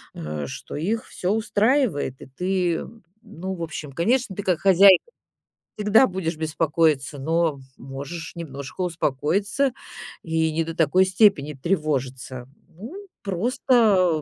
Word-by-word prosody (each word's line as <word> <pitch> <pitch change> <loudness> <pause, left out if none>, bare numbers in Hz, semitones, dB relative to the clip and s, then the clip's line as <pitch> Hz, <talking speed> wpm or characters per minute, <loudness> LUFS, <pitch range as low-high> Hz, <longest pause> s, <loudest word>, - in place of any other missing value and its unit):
э, 75 -1 -5
что 65 - -8
их 210 +9 -2
всё 185 +2 -2
устраивает. 215 - +1
И - - -10
ты, 180 +4 -1
м, 225 -3 -12 0.2
ну, 190 -3 -6
в 170 - -5
общем, 150 -3 -6
конечно, 215 - 0
ты 205 - -4
как 180 -3 +1
хозяйка 195 0 +7 0.8
всегда 210 +4 +5
будешь 175 -3 -3
беспокоиться, 155 -2 0
но, 165 +2 +1 0.3
м, - - -13
можешь 140 +5 -7
немножко 140 0 -7
успокоиться 180 - 0 0.5
и 160 -1 0
не 165 +1 +1
до 165 - -6
такой 170 +4 +3
степени 185 -6 +3
тревожиться. 130 -5 -2 0.2
Ну, 300 - -10 0.2
просто 200 - +2
170 Hz, 130 wpm, -23 LUFS, 150-200 Hz, 0.8 s, хозяйка